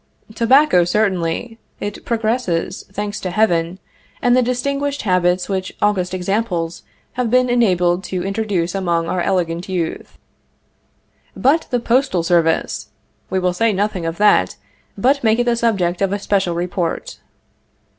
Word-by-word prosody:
Tobacco, 235 Hz, -3 st, +4 dB
certainly; 195 Hz, +3 st, -1 dB, 0.2 s
it 205 Hz, 0 st, -5 dB
progresses, 220 Hz, -6 st, -1 dB
thanks 205 Hz, +1 st, -4 dB
to 185 Hz, -, -4 dB
Heaven, 175 Hz, -4 st, +1 dB, 0.4 s
and 245 Hz, 0 st, +3 dB
the 255 Hz, -, +4 dB
distinguished 280 Hz, +3 st, -1 dB
habits 180 Hz, -2 st, +1 dB
which 190 Hz, -1 st, -3 dB
august 185 Hz, -3 st, 0 dB
examples 180 Hz, -3 st, -2 dB, 0.3 s
have 250 Hz, -2 st, -1 dB
been 250 Hz, +1 st, +3 dB
enabled 180 Hz, -6 st, +2 dB
to 180 Hz, -2 st, -3 dB
introduce 195 Hz, -4 st, -1 dB
among 170 Hz, -4 st, 0 dB
our 180 Hz, +1 st, -1 dB
elegant 175 Hz, 0 st, -1 dB
youth. 175 Hz, -3 st, -4 dB, 1.2 s
But 295 Hz, +6 st, +2 dB
the 245 Hz, -, +1 dB
postal 240 Hz, -6 st, +1 dB
service! 165 Hz, -2 st, +1 dB, 0.4 s
We 190 Hz, -, -1 dB
will 180 Hz, -1 st, +1 dB
say 225 Hz, +4 st, +1 dB
nothing 190 Hz, -3 st, -1 dB
of 165 Hz, 0 st, -4 dB
that, 200 Hz, -, +3 dB, 0.4 s
but 265 Hz, +6 st, +2 dB
make 220 Hz, 0 st, +3 dB
it 245 Hz, -, +2 dB
the 240 Hz, -1 st, +1 dB
subject 195 Hz, -7 st, 0 dB
of 195 Hz, -1 st, +1 dB
a 205 Hz, -, 0 dB
special 195 Hz, -4 st, 0 dB
report. 175 Hz, -1 st, -3 dB
195 Hz, 140 wpm, -19 LUFS, 175-230 Hz, 1.2 s, Tobacco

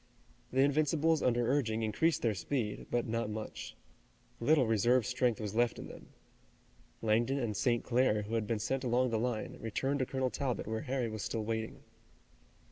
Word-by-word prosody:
The 130 Hz, -, +3 dB
Invincibles 155 Hz, +2 st, +3 dB
under 120 Hz, -1 st, +2 dB
urging 115 Hz, -5 st, +1 dB
increased 150 Hz, +10 st, +1 dB
their 115 Hz, -3 st, +2 dB
speed, 105 Hz, +2 st, -3 dB
but 120 Hz, -1 st, 0 dB
not 115 Hz, 0 st, -2 dB
much. 110 Hz, 0 st, -6 dB, 0.6 s
Little 135 Hz, +2 st, +4 dB
reserve 115 Hz, +2 st, +3 dB
strength 125 Hz, -3 st, +1 dB
was 105 Hz, -2 st, -4 dB
left 120 Hz, +1 st, +2 dB
in -, -, -7 dB
them. -, -, -11 dB, 1.0 s
Langdon 115 Hz, +5 st, +2 dB
and 115 Hz, -6 st, -2 dB
St. 120 Hz, +3 st, +1 dB
Clair, 120 Hz, -4 st, +2 dB
who 105 Hz, +3 st, -7 dB
had 110 Hz, -2 st, 0 dB
been 115 Hz, -, 0 dB
sent 130 Hz, +6 st, -2 dB
along 125 Hz, 0 st, +2 dB
the 110 Hz, -, +1 dB
line, 120 Hz, -2 st, -2 dB
returned 135 Hz, +6 st, -1 dB
to 130 Hz, -, 0 dB
Colonel 130 Hz, -1 st, -1 dB
Talbot 130 Hz, -4 st, -2 dB
where 110 Hz, +1 st, -3 dB
Harry 130 Hz, -4 st, -1 dB
was 110 Hz, -1 st, -5 dB
still 110 Hz, +2 st, -2 dB
waiting. 110 Hz, 0 st, -3 dB
120 Hz, 175 wpm, -33 LUFS, 110-130 Hz, 1.0 s, Little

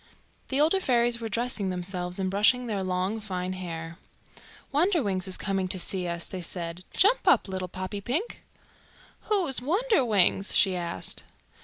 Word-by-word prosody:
The 270 Hz, -, 0 dB
older 320 Hz, +6 st, +4 dB
fairies 240 Hz, -6 st, +2 dB
were 225 Hz, -, -3 dB
dressing 230 Hz, -3 st, -1 dB
themselves 180 Hz, 0 st, -4 dB
and 190 Hz, -1 st, -1 dB
brushing 220 Hz, +5 st, +3 dB
their 210 Hz, -4 st, -2 dB
long 185 Hz, +3 st, -1 dB
fine 185 Hz, -3 st, -4 dB
hair. 165 Hz, -2 st, -6 dB, 0.8 s
"Wonderwings 275 Hz, -, +1 dB
is 185 Hz, -, -2 dB
coming 195 Hz, -2 st, -1 dB
to 185 Hz, -, +2 dB
see 180 Hz, 0 st, -2 dB
us," 170 Hz, 0 st, -2 dB
they 185 Hz, -2 st, -6 dB
said. 170 Hz, 0 st, -3 dB
"Jump 425 Hz, +6 st, +4 dB
up, -, -, +5 dB
little 185 Hz, -1 st, -4 dB
Poppypink." 205 Hz, -, -3 dB, 0.9 s
"Who 405 Hz, -4 st, +3 dB
is 265 Hz, -5 st, -3 dB
Wonderwings?" 255 Hz, -, +2 dB
she 190 Hz, -2 st, +4 dB
asked. 170 Hz, -1 st, 0 dB
195 Hz, 150 wpm, -27 LUFS, 185-250 Hz, 0.9 s, up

